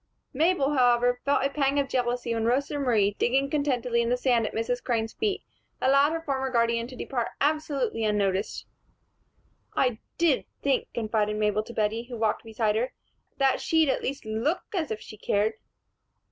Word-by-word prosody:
Mabel, 295 -1 +2
however, 245 -1 +3
felt 280 -1 +2
a - - +2
pang 280 -1 +1
of 280 -1 +2
jealousy 245 -2 -1
when 225 -1 -1
Rosa 275 +5 0
Marie, 215 -7 +2
digging 270 +3 +2
contentedly 250 -5 +1
in 235 - 0
the 250 - +2
sand 245 -3 +2
at - - -6
Mrs. 245 +2 -1
Crane's 225 -3 -1
feet, 415 -2 -1 0.4
allowed 275 +3 +4
her 330 0 -2
former 265 -3 -1
guardian 235 -1 +1
to 255 - -10
depart 245 -1 -2
absolutely 290 -5 0
unnoticed. 200 -2 0 1.1
"I 250 -4 +1 0.2
did 330 -6 +2 0.2
think," 275 -2 +1
confided 215 -2 0
Mabel 210 0 +1
to 230 +2 -10
Bettie, 220 +2 0
who 240 - -5
walked 220 -1 0
beside 220 -1 0
her, 250 +3 -1 0.4
"that 270 -1 +2
she'd 320 -3 +3
at - - +1
least 275 -1 -4
look 225 +11 -1
as 335 -6 -1
if 220 - -3
she 215 - -11
cared." 210 +1 +1
245 Hz, 175 wpm, -27 LUFS, 225-275 Hz, 1.1 s, allowed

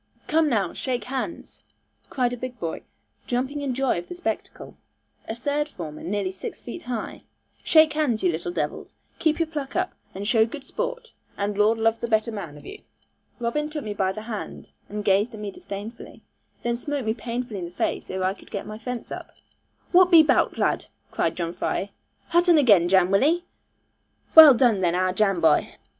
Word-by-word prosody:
'Come 315 -1 +3
now, 200 -8 0
shake 250 -4 -3
hands,' 265 +7 -5 0.5
cried 245 -2 0
a - - -1
big 250 0 -7
boy, 165 -3 -4 0.5
jumping 260 +4 -1
in 270 -3 -2
joy 265 -8 +1
of 175 - -10
the - - -7
spectacle, 355 - -5 0.5
a 225 - -2
third 290 +4 -1
former 155 - -8
nearly 195 +1 -2
six 190 - -7
feet 240 - -8
high; 240 -3 -5 0.4
'shake 315 -1 +5
hands, 290 -8 0
you 180 - +3
little 170 +2 -4
devils. - - -4 0.2
Keep 315 -2 +2
your 330 - +1
pluck 295 -4 -6
up, 365 +1 0 0.2
and 200 +2 -4
show 225 -1 +5
good 265 +5 -5
sport, - - -4 0.3
and 200 0 -1
Lord 210 +2 +3
love 225 0 +1
the 235 - -3
better 220 0 +1
man 175 -9 -7
of - - -14
you.' 410 - -9 0.6
Robin 300 +6 -1
took 300 -2 -5
me 210 - -4
by 190 -2 0
the 215 +3 -7
hand, 220 -2 -7 0.2
and 210 0 -5
gazed 205 +4 +2
at - - -9
me 210 -1 -5
disdainfully, 205 +4 -8
and - - -19 0.4
then 235 0 0
smote 285 0 -3
me 220 - +1
painfully 235 -3 -4
in 175 - -4
the - - -7
face, - - -2
ere 185 0 -3
I 185 +1 +1
could - - -17
get 200 - -5
my 215 +1 -8
fence 245 +1 -6
up. - - -7 0.6
'Whutt 365 0 +7
be 330 -3 +8
'bout, 300 - +2
lad?' - - 0 0.2
cried - - 0
John 170 -1 -2
Fry; 190 +2 -2 0.4
'hutt 345 +1 +3
un 340 - +7
again, 205 - +5
Jan, 190 -1 +4
wull 195 +5 +4
'e? 340 +4 +2 0.9
Well 310 -4 +11
done 230 -6 +3
then, 175 -1 +2
our 185 0 +1
Jan 195 -2 +2
boy.' 160 -2 +3
230 Hz, 200 wpm, -24 LUFS, 195-285 Hz, 0.9 s, Well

